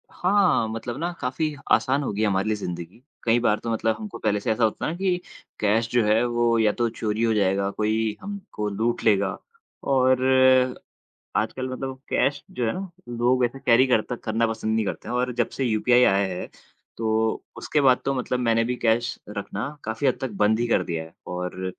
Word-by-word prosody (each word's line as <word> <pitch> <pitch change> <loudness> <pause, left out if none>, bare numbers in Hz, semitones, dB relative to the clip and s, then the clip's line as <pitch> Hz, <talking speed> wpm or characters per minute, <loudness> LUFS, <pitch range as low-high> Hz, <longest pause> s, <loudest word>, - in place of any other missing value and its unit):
हाँ, 190 - +2
मतलब 115 +2 -5
ना 170 +2 -1
काफ़ी 145 +4 -1 0.2
आसान 135 +2 +3
हो - - -2
गई 105 - -2
है 110 - +3
हमारे 100 +1 0
लिए 110 - +1
जिंदगी। 90 +2 -6 0.2
कई 115 +1 +3
बार 105 -3 +2
तो 115 - -3
मतलब 110 0 0
हमको 215 -2 -7
पहले 105 -1 +1
से 110 +3 -1
ऐसा 115 +2 0
होता 110 - 0
है - - -1
ना 170 - -6
कि 185 -1 +1 0.4
कैश 110 +2 +2
जो 120 -1 +3
है 110 +2 +3
वो 120 -1 +2
या 110 -1 +4
तो 120 - 0
चोरी 110 0 -2
हो 115 -1 +3
जाएगा 100 -2 +2
या 100 - 0
कोई 110 +1 -1
हमको 200 - -5
लूट 110 +4 -1
लेगा। 100 -3 +2 0.5
और 130 -1 +3 1.1
आजकल 120 +5 -1
मतलब 130 +1 -5
कैश 145 +1 +1
जो 125 -2 -2
है 110 - +1
ना 190 -1 -6 0.2
लोग 120 +2 +1
वैसे 120 +2 0
कैरी 125 +2 +6
करते 125 -1 +1
करना 115 +1 +1
पसंद 110 -1 -2
नहीं 110 -1 +1
करते - - -5
हैं 120 - -3
और 125 0 0
जब - - +1
से 135 - -3
यूपीआई 120 +2 +3
आया 100 -1 +3
है 90 - -5 0.5
तो 110 0 0
उसके 150 - 0
बाद 130 -3 +4
तो 135 - 0
मतलब 125 -1 -1
मैंने 115 -1 +2
भी 125 +2 -1
कैश 120 0 0 0.2
रखना 100 +4 -4 0.2
काफ़ी 110 +5 -2
हद 130 - +2
तक 130 - -3
बंद 110 +1 +4
ही 120 - +1
कर - - +3
दिया 80 -2 -3
है 80 - -16
और 90 +1 -4
115 Hz, 210 wpm, -24 LUFS, 110-130 Hz, 1.1 s, कैरी